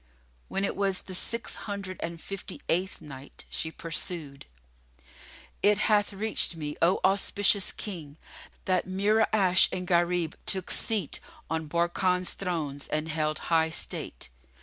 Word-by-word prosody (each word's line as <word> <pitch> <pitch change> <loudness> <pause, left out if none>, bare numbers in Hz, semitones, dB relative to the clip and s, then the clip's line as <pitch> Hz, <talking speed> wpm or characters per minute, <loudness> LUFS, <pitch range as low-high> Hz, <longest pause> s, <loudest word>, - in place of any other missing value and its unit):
When 195 +1 0
it - - -2
was 195 -2 +2
the 190 - -8
Six 230 +5 -1
Hundred 195 -2 -4
and 170 0 -4
Fifty 195 +3 -6
eighth 185 +2 0
Night, 140 -3 -10
She 160 - -2
pursued, 165 -3 -4 1.1
It 205 0 +5
hath 210 -1 +3
reached 205 -3 +2
me, 150 -2 -4
O 175 +3 +4
auspicious 200 +1 +3
King, 160 -8 -6 0.5
that 185 -1 +1
Mura'ash 195 -1 +4
and 180 0 -3
Gharib 175 -2 +2
took 190 -2 +1
seat 210 -9 +1 0.3
on 160 -1 -1
Barkan's 175 +2 +2
thrones 155 -7 -3
and 155 +1 -1
held 155 -1 0 0.2
high 160 0 +4
state. 160 - -4
180 Hz, 130 wpm, -28 LUFS, 160-195 Hz, 1.1 s, It